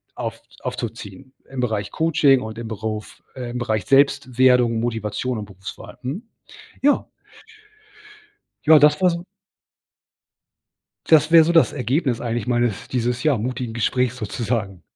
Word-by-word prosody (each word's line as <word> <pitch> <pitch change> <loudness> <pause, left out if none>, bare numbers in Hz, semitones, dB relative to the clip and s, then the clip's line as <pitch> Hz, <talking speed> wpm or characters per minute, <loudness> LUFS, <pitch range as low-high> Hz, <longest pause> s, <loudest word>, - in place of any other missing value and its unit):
auf - - -5 0.2
aufzuziehen 130 +7 -7 0.2
im 135 -1 -6
Bereich 105 -4 -2
Coaching 150 -5 +3
und 110 0 -7
im 115 -1 -6
Beruf, 110 -1 -6
äh 125 -2 -6
im 125 - -4
Bereich 110 -3 -1
Selbstwerdung, 130 -4 +3
Motivation 115 +1 -2
und 105 - -5
Berufswahl, 95 +1 -10
mhm, 145 - -5 0.6
ja. 290 +1 +2 1.6
Ja 155 -1 +7
das 150 +4 +5
war 185 - +5
so 170 +1 -4 1.8
Das 155 0 +5
wäre 165 -1 +8
so 170 - +1
das 165 -2 +4
Ergebnis 130 -1 -1
eigentlich 120 -2 -3
meines 120 -4 0
dieses, 125 -1 -1
ja, 150 -5 +2
mutigen 125 0 -4
Gesprächs 125 +2 0
sozusagen. 110 -4 -3
125 Hz, 130 wpm, -22 LUFS, 110-140 Hz, 1.8 s, wäre